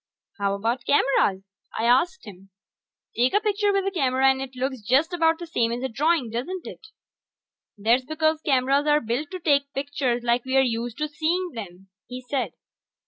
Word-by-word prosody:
"How 200 0 0
about 230 +5 -2
cameras?" 210 -9 +2 0.3
I - - -1
asked 300 +8 +2
him. 195 -2 -13 0.7
"Take 250 +9 +2
a - - +6
picture 415 -1 +1
with 395 -1 0
a 390 - 0
camera 265 -6 +3
and 265 0 -3
it 265 -1 -7
looks 260 -1 -3
just 270 - +2
about 325 -1 +2
the 345 - -7
same 235 -8 0
as 240 +2 -3
a 265 - -1
drawing, 290 -1 +1
don't 310 +11 -4
it?" 435 - -10 0.9
"That's 230 +5 +2
because 315 +1 0
cameras 275 0 +2
are 295 0 +4
built 245 +5 -3
to 370 - -6
take 280 -4 +1
pictures 270 -3 -2
like 240 0 +1
we're 265 +1 +2
used 235 -2 -2
to 305 +1 -1
seeing 340 +4 -1
them," 195 -5 -9 0.2
he 250 0 -7
said. 255 +1 -3
265 Hz, 185 wpm, -24 LUFS, 240-315 Hz, 0.9 s, a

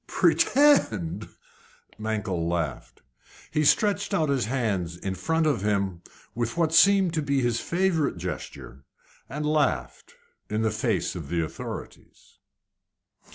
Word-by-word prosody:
"Pretend!" 115 - +2 0.7
Mankell 105 -6 -2
laughed. 85 -5 -4 0.5
He 155 - +1
stretched 200 +5 +2
out 155 -5 +1
his 135 -3 +1
hands 105 -9 -2
in 95 +2 -4
front 160 - 0
of 145 -10 +1
him 100 -4 -1 0.3
with 120 +5 -3
what 165 -2 +1
seemed 195 0 +5
to 160 - 0
be 140 -2 0
his 120 -1 0
favourite 170 - 0
gesture, 85 -6 -7 0.5
and 150 +2 -4
laughed 145 - -1 0.3
in 110 +1 -1
the 110 - +1
face - - -1
of - - -7
the 85 -1 0
authorities. - - -10
120 Hz, 125 wpm, -26 LUFS, -, 0.7 s, seemed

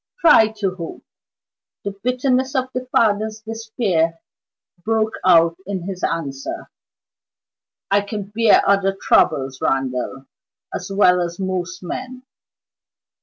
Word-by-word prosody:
"Try 225 -9 +7
to 195 -3 -1
hope." 165 -2 -7 0.8
The 200 - -3
bitterness 255 +5 0
of 260 0 0
the 255 0 -4
father's 215 -2 +1
despair 220 -7 -1 0.6
broke 220 0 0
out 170 -2 +5
in 190 -3 -3
his 185 0 -6
answer. 140 -5 -3 1.2
"I 200 +1 +4
can 200 -1 -6
bear 230 -2 +5
other 195 -1 +2
troubles, 135 -1 +2
Randal, 135 0 -1 0.5
as 180 - -5
well 180 -2 +4
as 170 +1 -4
most 185 -1 -3
men. 255 +7 -6
195 Hz, 115 wpm, -20 LUFS, 170-225 Hz, 1.2 s, Try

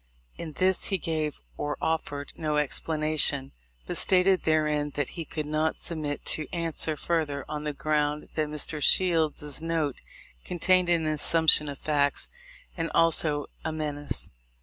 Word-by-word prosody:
In 160 -2 -7
this 185 +3 +2
he 195 - +1
gave 155 -3 -2 0.2
or 145 0 -3
offered 145 -3 -2
no 155 -2 -1
explanation, 150 -2 +1 0.3
but - - -3
stated 185 0 +3
therein 150 -2 +2
that 145 -3 -1
he 165 - -6
could 155 -1 -4
not 155 +1 0
submit 155 -3 -4
to 155 - 0
answer 165 -3 -1
further, 145 -4 -1
on 150 0 -5
the 150 - 0
ground 150 0 -1
that 155 -1 0
Mr. 150 0 -2
Shield's 155 -4 +3
note 160 -4 -1 0.4
contained 180 0 +2
an 170 -2 +2
assumption 155 0 +4
of 140 - -6
facts 145 -1 +2 0.5
and 165 -1 -2
also 155 -3 +3 0.2
a 160 - -2
menace. 150 -2 -3
155 Hz, 145 wpm, -27 LUFS, 150-165 Hz, 0.5 s, assumption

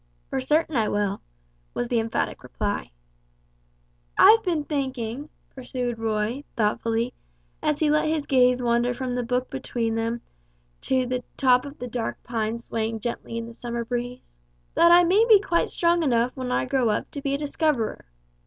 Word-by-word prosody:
"For - - 0
certain 305 +3 +1
I 220 -3 +2
will," 205 -1 -1 0.5
was 245 - -1
the 235 -1 +1
emphatic 225 0 -2
reply. - - -3 1.3
"I've 450 +1 +8
been 345 -7 -1
thinking," 270 -2 -3 0.2
pursued 245 -2 -4
Roy, 225 +4 -1
thoughtfully, 225 +2 0 0.5
as 300 -1 +1
he 300 -1 +3
let 305 +1 +2
his 310 -2 0
gaze 250 -1 +3
wander 240 +1 +1
from 255 0 -3
the 245 - -1
book 250 +1 -2
between 240 -4 -2
them 230 +1 -2 0.7
to 260 -1 +3
the 250 0 -2
top 255 -1 +4
of 285 +1 -9
the 250 - -6
dark 235 -1 -4
pines 230 0 -2
swaying 225 0 -2
gently 235 0 -4
in 230 - -3
the 230 - -10
summer 235 0 -4
breeze; 245 - -5 0.4
"that 340 0 +6
I 350 +1 +8
may 380 +6 +4
be 425 -3 +9
quite 345 -4 0
strong 340 0 +2
enough 245 -4 +2
when 255 -2 -4
I - - +1
grow 255 -3 +1
up 210 - -1
to 285 - -5
be 275 0 0
a - - -1
discoverer. 295 -5 -1
250 Hz, 170 wpm, -25 LUFS, 230-285 Hz, 1.3 s, be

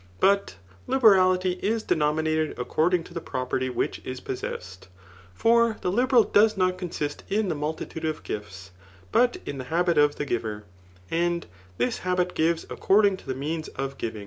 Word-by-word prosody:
But 200 - +2 0.3
liberality 185 -6 +4
is 220 +2 0
dencnninated 155 0 0
according 165 +8 +1
to 175 - -14
die 170 - -3
property 130 -2 -2
which 125 - -2
is 130 0 -5
possessed; 90 -9 -6 0.5
for 230 - +3
the 180 - 0
liberal 245 +2 +4
does 210 0 +3
not 185 -1 +1
consist 155 -5 -4
in 205 0 +1
the - - +1
multitude 155 +2 -4
of 155 -1 -3
gifts, 95 -3 -7 0.4
but 245 0 +3
in 140 - -5
the 130 - -5
habit 170 +2 +1
of 145 0 +4
the 145 - -3
giver 110 -5 -3 0.5
J 170 +1 +1
and 175 0 -1 0.3
this 120 +1 0
habit 180 0 0
gives 165 +1 +1
according 200 -1 +3
to - - -17
the 130 - -2
means 155 +4 -3
of 135 0 -5
giving. 110 -2 -4
165 Hz, 170 wpm, -26 LUFS, 135-185 Hz, 0.5 s, liberality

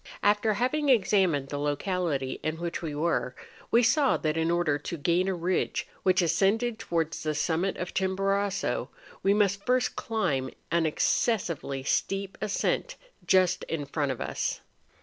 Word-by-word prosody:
After 210 +1 +3
having 280 +6 0
examined 190 - +3
the 145 - -3
locality 145 -2 -1
in 155 0 -2
which 170 0 -4
we 155 -3 -4
were, 150 -5 0 0.3
we 235 +1 +4
saw 270 +4 +3
that 155 -2 -1
in 165 0 +1
order 170 -4 +1
to 170 - -5
gain 175 +5 +1
a 190 - 0
ridge 175 +2 -1
which 185 -1 +3
ascended 220 +7 +1
towards 165 -1 -2
the 155 -1 -2
summit 170 +5 0
of 180 - -5
Chimborazo, 195 +1 0 0.3
we 195 +1 +3
must 200 -1 +2
first 250 0 +1
climb 140 -13 -1 0.2
an 165 -1 +2
excessively 155 - 0
steep 195 +7 -1
ascent 215 - -1 0.3
just 185 -1 +4
in 155 -3 -3
front 140 -1 -1
of 130 - -5
us. - - -2
180 Hz, 150 wpm, -28 LUFS, 155-200 Hz, 0.3 s, we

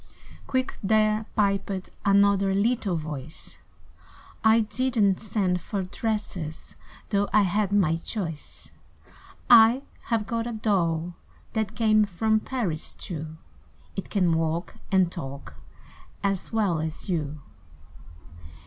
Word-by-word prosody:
Quick 260 0 -1
there 215 +1 +2
piped 195 -2 0
another 200 -1 +4
Little 215 -2 +1
voice 155 -2 -6 0.8
"I 220 +1 +6
did 245 +4 -1
n't 200 -3 +4
send 190 -4 0
for 200 +1 -3
dresses, 185 -5 -4 0.4
Though 200 -1 +1
I 210 0 +5
had 200 +1 +1
my 180 -6 +3
choice; 165 -4 -6 0.8
I 235 +3 +7 0.2
have 225 -3 0
got 230 +1 -2
a 240 - -4
doll 175 -6 0 0.4
that 220 -1 -1
Came 215 -2 +4
from 220 +3 +1
Paris 215 -11 -3
too; 160 -4 -6 0.6
It 195 - -5
can 180 -5 +2
walk 165 +2 -2
and 185 -3 +3
talk 140 - -7 0.7
as 195 -2 -1
Well 205 -7 +1
as 160 +4 -5
you!" 155 -5 -2
200 Hz, 115 wpm, -26 LUFS, 170-220 Hz, 0.8 s, I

